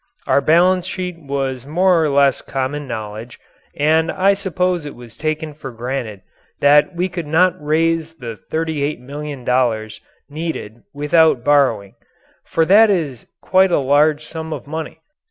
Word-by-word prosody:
Our - - +3
balance 180 +4 +3
sheet 180 -2 -5
was 135 -3 -3
more 175 +2 +3
or 155 - +1
less 140 -1 +3
common 140 +2 -4
knowledge 110 0 -7 0.4
and 160 +2 +2
I 195 +2 +3
suppose 180 -3 -1
it 145 - -8
was 120 -2 -13
taken 155 0 -3
for 145 -2 -9
granted 120 -4 -5 0.4
that 145 +4 +4
we 180 +2 0
could 170 -3 -6
not 175 +4 +3
raise 165 +1 0
the 120 -7 -8
$38,000,000 135 -7 -2 0.3
needed 145 -8 -6
without 150 -2 +2
borrowing. 125 -9 +2 0.5
For 165 - +1
that 210 +5 +6
is 155 - -2 0.2
quite 190 0 +3
a - - +3
large 145 +2 +2
sum 160 0 -7
of - - -7
money. 160 +2 -6
150 Hz, 140 wpm, -19 LUFS, 130-165 Hz, 0.5 s, that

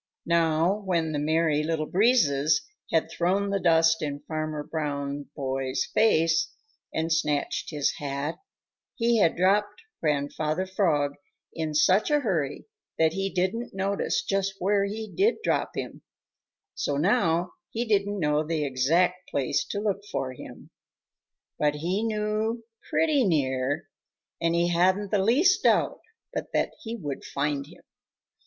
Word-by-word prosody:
Now 170 +3 +2
when 170 -4 0
the 150 - -1
Merry 155 0 +2
Little 155 0 -1
Breezes 155 - +3 0.3
had 160 - +1
thrown 195 +3 0
the 200 - +1
dust 165 -2 +4
in 145 -1 -3
Farmer 155 -1 -4
Brown's 145 -2 -3
boy's 135 -2 -2
face 165 -7 +3 0.4
and 160 +1 0
snatched 150 -3 -1
his 150 -3 0
hat, 140 +2 -3 0.6
he 235 -1 +2
had 165 - +3
dropped 205 - +2 0.2
Grandfather 150 +3 -1
Frog 165 -7 +1 0.4
in 160 -2 -3
such 185 - +4
a 295 -1 +3
hurry 160 - -1 0.3
that 160 0 +3
he 195 +1 -1
didn't 190 +5 -2
notice 195 +1 0
just 195 0 -1
where 200 +2 +2
he 215 +2 -4
did 395 - +1
drop - - 0
him, - - -5 0.7
so 145 - -2
now 175 - +2 0.2
he 235 +2 -2
didn't 205 -2 +1
know 150 -2 +1
the 155 -1 -1
exact 170 +8 +1
place 140 +1 0
to 200 - -4
look 205 -1 -1
for 130 -1 -2
him. - - -12 0.9
But 150 -1 +2
he 175 +7 -1
knew 220 +1 -1 0.3
pretty 305 -4 +3
near, 145 - 0 0.5
and 165 0 +2
he 170 +1 +2
hadn't 185 +4 +2
the 205 - +3
least 345 - +4
doubt - - +2 0.3
but - - -4
that - - +1
he 230 -1 -5
would 145 - -5
find 140 0 -2
him. - - -16
165 Hz, 140 wpm, -26 LUFS, 150-200 Hz, 0.9 s, dust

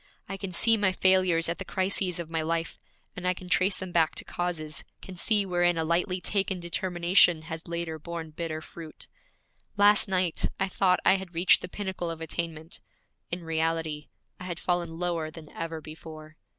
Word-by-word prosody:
I 195 - -4
can 195 -1 -5
see 225 +6 +4
my 205 -3 +3
failures 185 -3 +4
at 170 +3 -2
the - - -3
crises 185 -1 0
of 170 -2 -4
my 165 0 -1
life, 165 +1 -2 0.4
and 180 0 -4
I 180 - +2
can 185 - -10
trace 185 +2 +2
them 185 -1 -6
back 165 -2 +3
to - - -3
causes, 160 -3 -3 0.2
can 190 - -9
see 205 +3 +2
wherein 175 -2 +2
a 160 - +1
lightly 180 +3 +1
taken 190 0 0
determination 175 -1 +3
has 160 +1 -7
later 170 -2 -3
borne 165 0 -6
bitter 155 0 -4
fruit. 160 -2 -9 0.7
Last 205 0 +6
night 185 -3 +1
I 195 0 +1
thought 185 -1 +2
I 195 - +6
had 185 -3 -9
reached 175 +2 +5
the 180 - -5
pinnacle 190 -3 -4
of 165 -1 -5
attainment; 165 0 -5 0.5
in 175 0 -3
reality 160 -2 -1 0.3
I 180 - -7
had 175 -2 -4
fallen 175 -2 -1
lower 170 -3 -1
than 155 -1 -12
ever 165 -1 -4
before. 155 0 -10
175 Hz, 185 wpm, -28 LUFS, 165-185 Hz, 0.7 s, Last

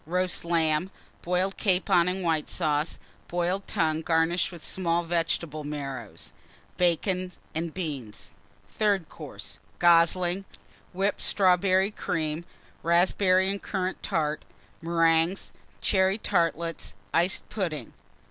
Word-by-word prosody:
Roast 180 +1 0
Lamb. 165 0 +1 0.3
Boiled 180 +2 0
Capon 180 -3 +3
and 185 +1 -1
White 160 -3 0
Sauce. 155 -2 0 0.3
Boiled 180 +3 -1
Tongue, 160 -1 +1
garnished 165 +2 +1
with 170 -3 -9
small 175 -2 +1
Vegetable 165 -2 -1
Marrows. 135 -6 -6 0.4
Bacon 180 +1 0 0.2
and 165 +1 -2
Beans. 145 - -6 0.4
THIRD 200 -6 0
COURSE. - - -9 0.2
Goslings. 175 +2 +4 0.5
Whipped 195 +2 -1
Strawberry 190 +1 +3
Cream. 160 -4 -2 0.4
Raspberry 185 +2 +3
and 200 +1 -2
Currant 190 -2 -3
Tart. 155 -1 -1 0.4
Meringues. 165 +2 +2 0.3
Cherry 190 0 +2
Tartlets. 170 - -1 0.2
Iced 175 +3 +2
Pudding. 155 - -3
175 Hz, 105 wpm, -27 LUFS, 160-185 Hz, 0.5 s, Goslings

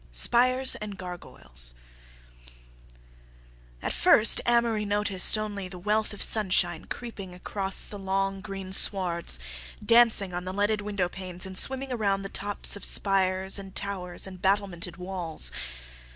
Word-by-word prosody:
Spires 255 - +3
and 210 -2 -8
Gargoyles 65 - -4 2.1
At - - -2
first 215 - +5
Amory 235 -3 +1
noticed 205 -1 +3
only 205 -3 -5
the 185 0 -10
wealth 210 +4 -1
of 205 - -1
sunshine 180 -5 +3
creeping 200 -7 -8
across 190 +1 0
the 205 - -8
long, 195 0 -2
green 195 -1 -7
swards, 180 -4 +1 0.5
dancing 230 -5 +4
on 175 0 -4
the 185 0 -6
leaded 205 +2 0
window 200 -3 -2
panes, 180 -1 -5
and 190 0 -8
swimming 265 +6 +1
around 200 -5 -1
the 195 - -6
tops 205 +1 0
of 205 - -10
spires 190 0 +2
and 195 -1 -11
towers 185 -3 -3
and 185 -2 -10
battlemented 190 -3 -1
walls. 180 -3 -2
195 Hz, 135 wpm, -26 LUFS, 185-210 Hz, 2.1 s, first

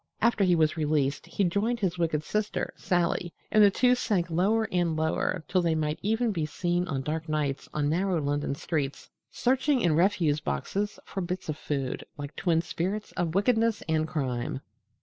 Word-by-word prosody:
After 230 -2 +3
he 180 -2 +4
was 160 0 +2
released 145 -3 0
he 200 - -1
joined 205 +7 +1
his 180 -4 -1
wicked 155 -3 0
sister, 210 +5 -2
Sally, 175 -1 0 0.2
and 215 - +6
the 205 - +8
two 250 +5 +3
sank 190 -8 0
lower 210 +7 +2
and 175 -3 +1
lower 160 +2 0
till 185 - +2
they 165 -2 +1
might 155 -1 -1
even 225 +3 +1
be 170 -6 -1
seen 175 +3 -1
on 135 -4 -2
dark 155 +2 -3
nights 145 -3 -1
on 150 -1 0
narrow 180 +2 +1
London 145 -1 -1
streets 145 -2 -3 0.2
searching 265 +2 +2
in 170 -6 +3
refuse 170 -4 +2
boxes 195 - -2
for 195 - -4
bits 180 -1 -4
of 155 - -1
food, 135 -3 -3
like 145 0 -7
twin 165 -2 +1
spirits 195 +6 -3
of 170 -1 -2
wickedness 225 +1 +2
and 155 -1 +1
crime. 130 -4 -2
170 Hz, 180 wpm, -28 LUFS, 155-200 Hz, 0.2 s, the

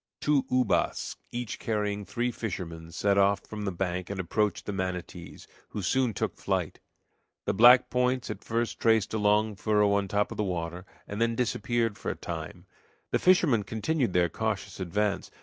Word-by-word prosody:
Two 145 -3 +2
ubas, 125 0 +1 0.2
each 120 -2 -4
carrying 105 -2 -2
three 120 +4 -1
fishermen, 85 -8 -5
set 100 +3 +2
off 100 0 +3
from 105 -1 -7
the 100 - -1
bank 90 0 -3
and 100 -1 -4
approached 105 +4 0
the 105 - -3
manatees, 90 -2 -5 0.2
who 105 - -5
soon 125 +6 +2
took - - -2
flight. - - -2 0.7
The - - +1
black 120 +5 +7
points 125 0 +1
at - - -8
first 115 +1 -2
traced 110 -2 +3
a 110 - 0
long 105 +1 +2
furrow 105 +1 +2
on 100 0 +2
the 95 - -11
top 105 0 +1
of - - -6
the 105 - +1
water, 90 -1 -4 0.2
and 105 +2 -4
then 115 0 +2
disappeared 115 -1 0
for - - -3
a - - -2
time. - - -7 0.5
The - - +2
fishermen 170 - +4
continued 110 - -1
their 90 -1 +4
cautious 110 +4 -3
advance. 100 +3 -1
105 Hz, 180 wpm, -28 LUFS, 95-115 Hz, 0.7 s, black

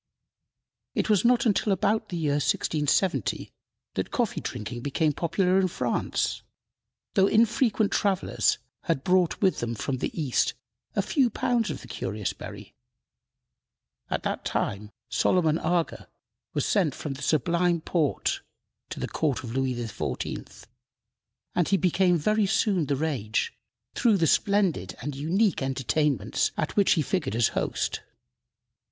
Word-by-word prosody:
It - - +1
was 205 - +4
not 245 +1 +4
until 210 -1 +2
about 210 +3 +1
the 175 - -3
year 155 -3 0
1670 155 +6 0 0.4
that - - -2
coffee 240 -4 -1
drinking 120 0 -5
became 150 +3 +1
popular 180 +4 +2
in 190 - +3
France, 180 - -1 0.7
though 195 -2 +4
infrequent 225 -1 +3
travelers 195 -3 +1 0.3
had 165 -7 0
brought 180 -2 +2
with 190 -2 +3
them 120 0 -2
from 130 +4 -2
the - - -1
East 140 -6 +1 0.4
a - - +2
few 270 -6 +2
pounds 230 -1 0
of 150 - -4
the - - -12
curious 105 -2 -3
berry. - - -10 1.4
At - - -2
that - - -2
time 105 +1 -2 0.2
Solomon 160 +4 +2
Aga 170 0 -1 0.5
was - - +1
sent 180 - +2
from 145 - -4
the 135 - -10
Sublime 170 +4 +2
Porte 155 -4 0 0.5
to - - -6
the - - -2
court 145 -7 -1
of 115 -2 -6
Louis 130 -1 0
XIV., 115 -4 -5 0.9
and 175 - +1
he 195 - +3
became 180 0 +3
very 215 +6 +2
soon 190 -6 +1
the 140 - +1
rage, 130 -8 -1 0.4
through 230 -4 +3
the 165 - +2
splendid 180 - +2
and 140 +3 -5
unique 175 +8 +1
entertainments 135 +2 0
at - - -2
which 200 -2 +5
he 155 - +1
figured 145 - -1
as 115 -1 +3
host. - - -2
170 Hz, 140 wpm, -27 LUFS, 135-195 Hz, 1.4 s, which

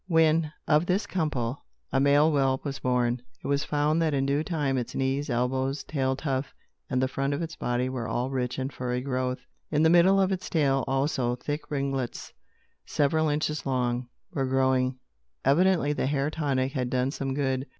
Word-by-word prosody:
When, 160 -2 +3 0.2
of 155 +3 +3
this 195 +3 +1
couple, 145 -9 -2 0.3
a 135 - +2
male 145 +3 +5
whelp 135 -2 +1
was 140 -1 -3
born, 125 -1 +1 0.2
it - - -11
was 140 0 +1
found 150 +2 +1
that 155 -3 +1
in 135 0 +1
due 140 +2 +1
time 150 -6 -1
its 120 - -5
knees, 135 +2 0
elbows, 130 +3 0
tail 135 -3 -1
tuft, 135 -1 -3 0.3
and 130 - +1
the 130 - +2
front 135 +2 -1
of 145 - -4
its 165 -1 -5
body 125 +1 -1
were 130 -3 -3
all 125 +2 -1
rich 125 -2 -2
in 130 0 -2
furry 125 -1 -2
growth. 130 -1 -2 0.2
In 150 0 +2
the 160 - +5
middle 180 +3 +6
of 190 0 +2
its 190 -1 -3
tail, 135 -4 +2
also, 135 -2 0
thick 145 +4 -5
ringlets, 135 -3 -3 0.5
several 155 +2 +1
inches 150 0 -1
long, 125 -2 -1 0.3
were 135 -2 0
growing. 130 -1 +2 0.5
Evidently, 160 +1 +3
the 140 - -1
hair 140 +1 0
tonic 135 -4 0
had 130 -4 -2
done 130 +1 0
some 135 -2 -3
good. 130 -1 -1
135 Hz, 185 wpm, -27 LUFS, 130-150 Hz, 0.5 s, middle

